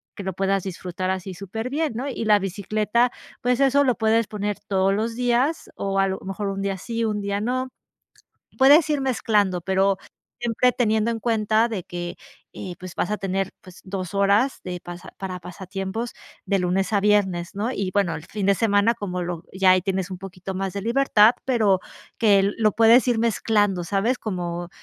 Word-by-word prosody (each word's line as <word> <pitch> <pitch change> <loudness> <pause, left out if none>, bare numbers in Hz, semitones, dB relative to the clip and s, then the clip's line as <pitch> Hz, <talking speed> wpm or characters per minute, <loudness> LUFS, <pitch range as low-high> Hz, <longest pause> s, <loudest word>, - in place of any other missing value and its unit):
que 200 - -7
lo 190 0 -3
puedas 195 +1 0
disfrutar 185 0 -4
así 190 0 -3
súper 200 +6 -5
bien, 300 0 -1
¿no?, 255 +5 -3
y 235 -3 -4
la 210 -1 +5
bicicleta, 210 +5 0 0.3
pues 250 +1 +1
eso 275 +1 +4
lo 250 -3 +2
puedes 225 0 +2
poner 205 -1 -3
todos 195 0 +2
los 225 +3 -1
días, 250 +5 0
o 195 0 -1
a 195 - +3
lo 190 0 -3
mejor 195 +1 -4
un 195 0 -3
día 195 -1 -2
sí, 230 +4 -3
un 210 -2 -1
día 200 0 -2
no. 255 +3 -1 0.9
Puedes 290 +4 +6
ir 295 -2 +1
mezclando, 210 -8 +1
pero 190 +1 +2 0.4
siempre 240 +1 +2
teniendo 220 -2 +1
en 225 - -3
cuenta 220 0 +2
de 205 -6 -4
que, 175 0 -6 0.4
eh, 180 -2 -7
pues 185 -1 -9
vas 205 - -1
a 210 - 0
tener, 195 -1 -2
pues 185 -1 -14
dos 185 -1 -5
horas 200 +6 +2
de 180 -1 -5
pasa 175 +1 -10
para 185 -2 -5
pasatiempos 190 +5 -5 0.3
de 200 -1 +1
lunes 185 +3 0
a 200 - +3
viernes, 195 -4 +1
¿no?, 215 +5 -1
y 195 -6 -2
bueno, 195 -5 +1
el 155 - -8
fin 210 -3 -4
de 200 - +4
semana, 205 +1 +3
como 180 -4 -4
lo 175 -1 -5
ya 190 0 +4
ahí 185 0 +4
tienes 190 0 -2
un 185 - -5
poquito 190 0 -7
más 195 0 -2
de 200 - -4
libertad, 230 -1 +4
pero 215 -7 +3 0.4
que 200 -3 +4
lo 215 -2 +3
puedes 230 +2 +6
ir 240 - +2
mezclando, 210 -4 +1
¿sabes?, 200 +8 0
como 175 -4 -4
200 Hz, 195 wpm, -23 LUFS, 190-230 Hz, 0.9 s, Puedes